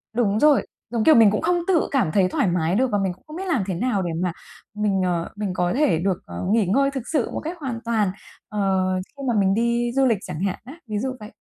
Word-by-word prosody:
đúng 215 -3 +1
rồi, 300 0 +4 0.2
giống 230 -1 -1
kiểu 315 - +6
mình 220 -3 +7
cũng 210 - -1
không 355 -1 +1
tự 365 -4 +2
cảm 245 - +1
thấy 185 +1 +3
thoải 195 - +1
mái 175 0 +1
được 260 +4 +2
và 205 - +2
mình 190 -2 -1
cũng 180 - -24
không 305 - -9
biết 380 +2 -5
làm 270 - +1
thế 190 - -1
nào 205 +2 0
để 175 - -2
mà 180 - 0 0.4
mình, 205 -2 0
ờ, 170 -2 -1
mình 205 -3 -3
có 180 -1 0
thể 260 - +3
được, 190 0 0
ờ, 85 0 -6
nghỉ 220 -2 +3
ngơi 275 +9 +2
thực 265 -3 -4
sự 285 -7 +1
một - - -3
cách 335 +3 -5
hoàn 260 -6 -4
toàn, 220 -4 +1 0.4
ờ, 210 - -4 0.6
khi 275 - -7
mà 240 - +2
mình 195 -1 +3
đi 235 +2 +1
du 270 0 +4
lịch 230 -4 +3
chẳng 155 - -6
hạn 190 0 -2
á? 265 - -9
Ví 215 - -3
dụ 260 +2 -2
vậy. 210 - -9
215 Hz, 270 wpm, -23 LUFS, 190-260 Hz, 0.6 s, mình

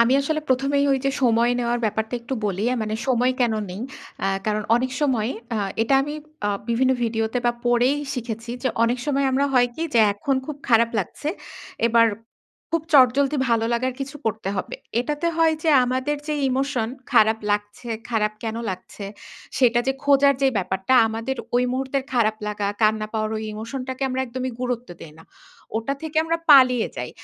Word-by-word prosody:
আমি 235 +2 +4
আসলে 310 +2 -1
প্রথমেই 275 +2 +2
ঐ - - +5
যে - - +3
সময় 235 -1 +3
নেওয়ার 240 0 0
ব্যাপারটা 220 +2 -1
একটু 245 +3 -4
বলি। 195 0 -2 0.2
মানে 215 0 -2
সময় 250 0 +2
কেন 235 -2 +2 0.2
নেই? 185 +3 -6 0.4
অ্যাঁ 195 0 0
কারণ 215 0 0
অনেক 255 +1 -1
সময় 250 -6 +1 0.3
আ - - 0 0.2
এটা 230 +4 +2
আমি 295 +2 -4 0.3
আ - - +1 0.2
বিভিন্ন 255 +3 +3
ভিডিওতে 225 +1 0
বা 240 - +3
পড়েই 245 +3 +3 0.2
শিখেছি 230 -2 -5
যে 260 - +2
অনেক 235 +2 +2
সময় 275 -1 +1
আমরা 275 +2 +2
হয় 245 -1 +5
কি? 320 - -4
যে - - +5
এখন 265 +7 -1
খুব 300 - -5
খারাপ 230 -1 +4
লাগছে। 210 - -3 0.6
এবার 230 0 +5 0.6
খুব 330 -1 0
চটজলদি 275 +1 +5
ভালো 230 -1 +2
লাগার 255 +2 0
কিছু 275 +1 -5
করতে 220 -3 -2
হবে। 185 - -4 0.3
এটাতে 295 +6 -2
হয় 325 -1 +4
যে 320 - +3
আমাদের 260 +4 -1
যে 300 - 0
ইমোশন 260 -3 0 0.2
খারাপ 220 -2 +5
লাগছে, 205 +3 -3 0.2
খারাপ 215 -2 +1
কেন 225 0 -3
লাগছে? 185 +2 -8 0.5
সেটা 240 -2 +4
যে 265 - +2
খোঁজার 280 0 +5
যে 270 - +5
ব্যাপারটা 190 +4 0
আমাদের 225 +4 -3 0.2
ওই 250 - +3
মুহূর্তের 265 +1 -2
খারাপ 220 -3 +2
লাগা, 210 -1 -2 0.2
কান্না 215 0 +2
পাওয়ার 215 -1 -1
ওই 215 - -4
ইমোশন 225 +5 -5
টাকে 260 +1 -4
আমরা 260 +1 -2
একদমই 255 +1 -4
গুরুত্ব 245 -1 -3
দেই 155 - -10
না। - - -13 0.5
ওটা 230 +5 -1
থেকে 315 0 -6
আমরা 330 +1 0
পালিয়ে 255 -4 +6
যাই। - - -4
245 Hz, 180 wpm, -23 LUFS, 220-270 Hz, 0.6 s, পালিয়ে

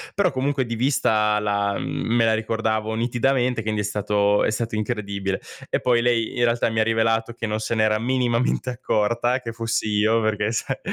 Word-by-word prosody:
però 195 -4 +2
comunque 135 0 -1
di 115 0 -4
vista 110 -5 +2
la 100 -1 0
me 115 0 0
la 110 -1 +3
ricordavo 110 0 -1
nitidamente, 120 +1 0
quindi 105 -1 -1
è - - -3
stato 105 0 +1
è - - +1
stato 110 0 -3
incredibile. 100 -3 -3 0.3
E - - 0
poi 120 -2 +3
lei, 120 -2 +1
in 120 - +3
realtà 115 0 +1
mi 110 0 -1
ha - - +4
rivelato 115 +1 +1
che 115 - -5
non 110 0 -2
se 115 +1 -2
n'era 110 0 +2
minimamente 125 0 0
accorta 120 +1 0
che 115 - -5
fossi 115 -1 -2
io, 110 +2 +2
perché, 110 +1 0
sa - - -2
115 Hz, 185 wpm, -23 LUFS, 105-120 Hz, 0.3 s, ha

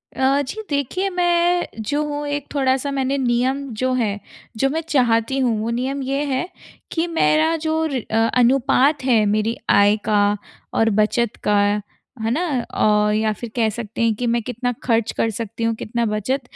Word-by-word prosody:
अ, 270 +2 +2
जी 435 - -5
देखिए 295 +8 -1
मैं 350 -1 +2
जो 285 +8 -1
हूँ 295 0 -4
एक 285 -1 -3
थोड़ा-सा 270 0 +1
मैंने 270 0 0
नियम 260 +2 0 0.2
जो 255 0 +1
है 210 -5 0 0.4
जो 270 +3 +2
मैं 320 +3 -1
चाहती 245 -1 +2
हूँ, 240 -4 +1
वो 225 - -2
नियम 260 +4 -2
ये 275 +2 -1
है 305 +7 -1 0.4
कि 330 +1 0
मेरा 320 -1 +2
जो 320 0 +1
र 255 -3 -1
अ, 220 - 0 0.2
अनुपात 265 +3 +3
है 230 -5 +3
मेरी 215 +2 +1
आय 205 +1 +5
का 205 -1 +4 0.5
और 225 - +3
बचत 225 +1 +1
का। 205 -1 +4 0.6
है 225 +1 0
ना? 310 +8 0 0.3
औ 210 0 +3
या 215 0 +1
फ़िर 235 +2 -8
कह 225 -2 +2
सकते 225 0 -6
हैं 230 -1 +3
कि 245 - -3
मैं 235 0 +1
कितना 245 +1 -2
ख़र्च 230 -2 +1
कर 225 - +1
सकती 230 +1 -5
हूँ, 230 0 +1
कितना 235 +2 -2
बचत? 215 +6 -1
250 Hz, 180 wpm, -21 LUFS, 225-280 Hz, 0.6 s, आय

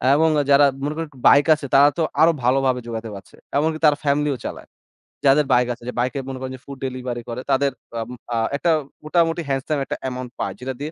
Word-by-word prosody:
এবং 160 +2 +4 0.2
যারা 140 +1 +7 0.2
মনে 145 +1 -1
করেন 165 -1 -4 0.2
Bike 145 +3 +6
আছে 150 - -8
তারা 140 +1 +7
তো 165 - +1 0.2
আরো 165 - +7
ভালোভাবে 130 0 +2
জোগাতে 115 -1 -5
পারছে। 95 -3 -13 0.2
এমনকি 155 +2 0
তারা 150 -1 +5
ফ্যামিলিও 145 -1 +1
চালায়। - - -7 0.6
যাদের 140 +2 +5
Bike 125 0 +3
আছে, 120 - -15
যে - - -5
Bike-এ 130 +3 -1
মনে 130 -1 -5
করেন 130 0 -5
যে - - -25
food 140 -1 -9
delivery 125 -2 -4
করে 120 +2 -4
তাদের 135 +1 +2 0.3
আ - - -2 0.3
আ - - 0 0.2
একটা 165 +5 +1 0.3
মোটামুটি 165 +1 +1
handsome 135 +2 -1
একটা - - -4
অ্যামাউন্ট 125 -1 -5
পায়। - - -2
যেটা 130 +1 -4
দিয়ে 150 +2 -4
140 Hz, 210 wpm, -22 LUFS, 125-150 Hz, 0.6 s, যারা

